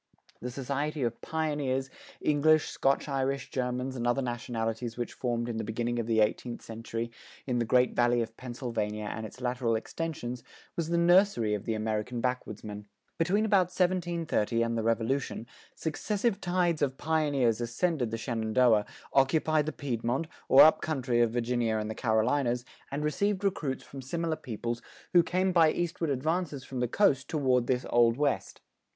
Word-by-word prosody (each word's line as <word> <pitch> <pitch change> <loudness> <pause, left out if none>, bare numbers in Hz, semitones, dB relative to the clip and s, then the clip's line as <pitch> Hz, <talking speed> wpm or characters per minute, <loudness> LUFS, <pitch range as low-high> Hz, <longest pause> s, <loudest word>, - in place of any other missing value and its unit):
The 125 - -4
society 140 +3 -2
of 115 -1 -2
pioneers, 145 -4 -1 0.3
English, 155 +1 +3
Scotch 135 +2 +1
Irish, 135 -1 -1
Germans, 125 0 -2
and 120 -1 -2
other 130 +3 +1
nationalities 120 -1 -3
which 120 - -3
formed 120 -2 -2
in 115 -2 -3
the 110 - -2
beginning 120 +2 -2
of 115 - -2
the 110 -1 +3
eighteenth 115 +3 -1
century 115 +1 -5 0.3
in 125 -2 0
the 120 - +1
Great 125 +2 +3
Valley 120 0 +3
of 115 0 -9
Pennsylvania 115 -4 -4
and 110 0 -5
its 125 - -15
lateral 125 -2 0
extensions 125 -1 -4 0.3
was 165 -2 -2
the 170 - +1
nursery 170 - +4
of 105 - -3
the 110 - -1
American 110 +2 -2
backwoodsmen. 110 -4 -4 0.3
Between 195 +6 +2
about 195 -4 +4
1730 170 - 0
and 115 0 -1
the 115 - 0
Revolution, 115 +3 -1 0.3
successive 205 +6 -1
tides 175 -3 +1
of 135 -2 0
pioneers 145 -8 +1
ascended 125 +2 0
the 115 - -3
Shenandoah, 115 -1 +2 0.3
occupied 150 +3 +3
the - - 0
Piedmont, 130 0 -2 0.2
or 135 - +10
up 155 - +6
country 125 -6 0
of 120 - +4
Virginia 120 -1 0
and 110 0 -2
the - - -3
Carolinas, 120 +3 +1 0.2
and 145 +2 -3
received 200 +6 0
recruits 150 -9 -1
from 135 - -9
similar 165 +4 -2
peoples 120 -3 -4 0.3
who 175 - +8
came 185 +3 +1
by 165 -3 +5
eastward 170 -2 -2
advances 150 +1 -1
from 130 -1 -6
the 125 - +1
coast 135 - +2
toward 130 -5 +2
this 125 -1 0
Old 120 0 +4
West. 145 -1 -1
125 Hz, 165 wpm, -29 LUFS, 115-155 Hz, 0.3 s, or